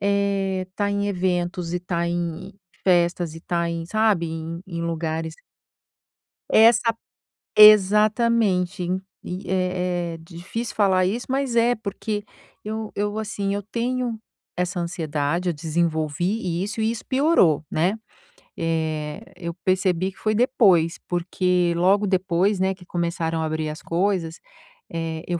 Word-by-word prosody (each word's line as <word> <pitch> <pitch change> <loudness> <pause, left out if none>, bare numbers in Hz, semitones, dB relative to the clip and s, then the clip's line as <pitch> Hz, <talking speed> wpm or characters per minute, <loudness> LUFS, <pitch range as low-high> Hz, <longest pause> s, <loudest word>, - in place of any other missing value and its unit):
eh, 200 -2 0
estar 200 +2 -2
em 200 0 0
eventos 180 -2 -1
e 180 - -1
tá 170 -1 -2
em 175 +2 -3 0.3
festas 175 -2 +2
e 165 - -9
tá 170 0 -1
em, 165 0 -4
sabe, 215 -3 +2
em 165 +1 -5
em 170 -2 -5
lugares 160 -1 -3 1.2
Essa 230 +1 +5 0.6
exatamente. 210 -2 +5
En 185 +2 -1 0.2
e 180 +2 -6
é 180 -2 -1
é - - -6
difícil 175 +8 -6
falar 190 -3 +3
isso, 225 +7 -2
mas 265 -2 -1
é, 235 +1 +4
porque 210 -1 -4 0.4
eu 220 0 -4
eu 205 +1 -2
assim, 205 -2 -2
eu 205 - -3
tenho 240 +2 -2 0.4
essa 180 +1 -1
ansiedade, 170 0 -2
eu - - 0
desenvolvi 170 +4 -1
isso 210 +3 -4
e 220 +1 +2
isso 230 - -5
piorou, 260 - +3
né. 185 +8 +1 0.6
Eh, 160 +1 -2
eu 170 -1 -5
percebi 185 0 +1
que - - -25
foi 215 0 0
depois, 205 -9 +3
porque 180 0 +1
logo 195 +4 +3
depois, 185 +1 +1
né, 190 0 +1
que 180 -1 -16
começaram 170 -2 -2
a 160 - 0
abrir 155 0 -2
as 150 - -7
coisas, 170 -2 -1 0.5
é, 165 -1 -4
eu 175 -1 -1
180 Hz, 140 wpm, -23 LUFS, 170-205 Hz, 1.2 s, Essa